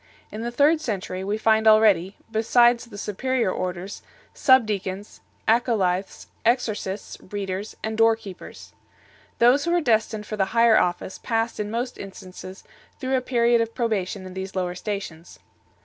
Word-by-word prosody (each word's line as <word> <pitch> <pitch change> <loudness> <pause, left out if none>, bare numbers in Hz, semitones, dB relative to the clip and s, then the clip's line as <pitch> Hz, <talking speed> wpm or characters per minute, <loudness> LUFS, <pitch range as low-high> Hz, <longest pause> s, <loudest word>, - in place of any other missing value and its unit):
In 215 - -6
the 235 - -2
third 290 +6 +3
century 190 -6 -4
we 205 +2 -1
find 220 0 +3
already, 205 -4 +4
besides 235 +2 +3
the 235 -4 -12
superior 235 +2 -1
orders, 185 +2 -4 0.3
sub 260 -3 +5
deacons, 200 -1 -5 0.3
acolyths, 205 -5 +1 0.2
exorcists, 215 -5 -1
readers, 200 0 -4
and 220 0 -3
door 225 0 +5
keepers 195 -5 -11 0.6
8. - - -40
Those 250 +5 +4
who 340 - 0
were 350 - +3
destined 220 -6 0
for 215 - -5
the 195 - +2
higher 230 -1 +6
office 175 +1 -2
passed 225 0 -2
in 210 0 -2
most 240 +3 -3
instances 185 -1 -10 0.4
through 265 -1 -1
a 255 - +1
period 235 -2 +2
of 230 0 -3
probation 205 -5 -2
in 185 - -9
these 190 +1 -6
lower 180 -1 -1
stations. 180 -4 -6
215 Hz, 155 wpm, -24 LUFS, 190-235 Hz, 0.6 s, higher